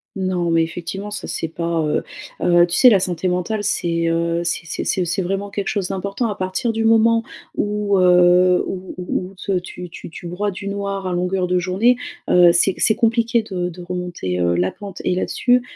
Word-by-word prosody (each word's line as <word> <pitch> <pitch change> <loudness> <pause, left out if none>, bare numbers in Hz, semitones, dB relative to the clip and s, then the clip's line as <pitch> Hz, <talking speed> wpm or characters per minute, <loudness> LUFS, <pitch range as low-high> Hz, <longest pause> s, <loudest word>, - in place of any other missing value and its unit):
Non, 185 -3 -1
mais 165 0 +3
effectivement, 180 +5 -5
ça, 205 - -5
c'est 165 - -3
pas, 170 0 -2
heu, 150 - 0 0.4
heu, 175 0 +5
tu 175 0 -3
sais, 255 - +8
la 205 -5 +5
santé 180 0 -2
mentale, 180 +4 -1
c'est, 170 -4 0
heu, 170 0 0
c'est 170 0 -2
c'est 165 - -4
c'est 185 - 0
c'est 180 +3 -1
vraiment 195 +2 -3
quelque 200 -1 -3
chose 200 -4 -1
d'important 200 +4 -2
à 210 - -2
partir 190 +6 -2
du 225 0 -1
moment 225 0 +4 0.3
où, 205 -1 0
heu, 180 0 +5
où 185 0 -6
où 180 0 -3
où 195 - -17
te 190 0 -1
tu 180 -1 -9
tu - - -9
tu 170 - -11
broies 190 +4 -2
du 200 0 -6
noir 200 -1 -3
à 185 - -2
longueur 180 +1 0
de 180 0 +1
journée, 195 +8 +2 0.3
heu, 180 -1 +7
c'est 180 +3 +3
c'est 220 - +3
compliqué 230 0 +2
de 180 -4 -3
de 180 +1 -10
remonter, 175 - -4
heu, 85 0 +2
la 90 +2 +1
pente 200 -2 -9
et - - +1
là-dessus, 245 +7 +2
185 Hz, 210 wpm, -20 LUFS, 175-200 Hz, 0.4 s, sais